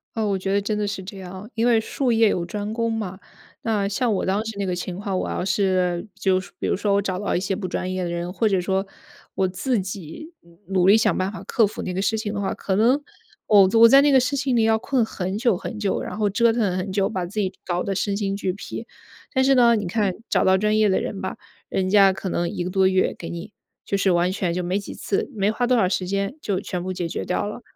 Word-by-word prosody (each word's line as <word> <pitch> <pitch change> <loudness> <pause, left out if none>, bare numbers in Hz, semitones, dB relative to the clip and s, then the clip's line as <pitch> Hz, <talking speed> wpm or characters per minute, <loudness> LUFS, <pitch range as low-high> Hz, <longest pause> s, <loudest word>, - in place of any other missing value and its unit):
呃， 220 -2 0
我 195 -1 +1
觉 195 +1 -3
得 200 - +3
真 210 +1 -2
的 210 -1 -1
是 200 -1 -4
这 195 +1 -9
样， 190 +3 -9
因 230 +1 +1
为 235 -2 +4
术 245 +3 -1
业 225 -1 +4
有 180 - 0
专 210 +3 -4
攻 230 0 0
嘛。 200 -4 -4 0.4
那 210 -3 0
像 220 +3 0
我 195 - -1
当 200 +3 0
时 225 - -4
那 200 - -1
个 180 -1 -1
情 180 0 -5
况， 200 -2 -2
我 - - -2
要 180 - -2
是 185 -2 +1
就 190 -1 +2
是 190 - -9
说 - - -22
比 - - -2
如 - - +1
说 205 +1 0
我 200 - +3
找 185 -2 -3
到 205 - -1
一 - - +2
些 195 +1 -2
不 190 -1 -4
专 185 0 -3
业 185 0 -2
的 175 - -2
人， 175 +1 -3
或 220 +1 +1
者 190 -2 +2
说 190 +2 -1 0.5
我 190 - +2
自 210 +6 -1
己 190 - -7
努 170 0 -22
努 185 -1 +2
力 210 +3 +7
想 220 - +2
办 185 +1 -1
法 215 - -8
克 225 -3 +2
服 205 - -7
那 180 - -3
个 190 - -1
事 220 +2 +1
情 215 -1 -3
的 200 - -2
话， 195 - -1
可 190 - -2
能 240 +8 +4 0.5
我 200 -3 +6
我 230 - +10
在 275 +4 +7
那 290 0 +4
个 265 - +6
事 280 +3 0
情 270 -2 0
里 230 - +3
要 220 0 +3
困 245 0 +1
很 190 -1 -4
久 235 -3 +2
很 215 +5 -6
久， 205 -2 -1
然 - - -6
后 210 -1 +1
折 230 +4 +3
腾 210 -6 0
很 185 +1 -3
久， 195 0 +1
把 185 -5 -3
自 205 +4 -4
己 190 -2 -1
搞 175 0 -1
得 195 - -2
身 200 +1 -1
心 200 -1 -1
俱 190 -2 -1
疲。 220 +3 -7 0.5
但 260 - +3
是 270 +1 +4
呢， 240 -2 +5
你 210 -3 -2
看 195 0 0
找 - - +2
到 190 0 +4
专 210 +2 +1
业 215 -1 +4
的 190 - +2
人 195 - -4
吧， 190 - -4 0.3
人 185 -1 -1
家 195 -1 +6
可 190 0 -5
能 175 -1 -1
1 - - -3
个 180 - -4
多 190 -1 +3
月 185 0 +2
给 170 - -7
你， 170 +4 -7 0.3
就 200 - -1
是 195 -1 +2
完 175 +1 +2
全 185 -3 -1
就 180 - -1
没 180 +3 0
几 200 - -8
次、 200 - -2
没 200 +1 +1
花 245 +2 -1
多 250 0 +3
少 190 -5 +3
时 180 -1 -1
间 200 +6 -1
就 195 -8 -1
全 180 -3 -4
部 185 +1 -4
解 175 -2 -3
决 - - -4
掉 180 - -1
了。 210 +4 -6
200 Hz, 300 characters per minute, -23 LUFS, 185-220 Hz, 0.5 s, 我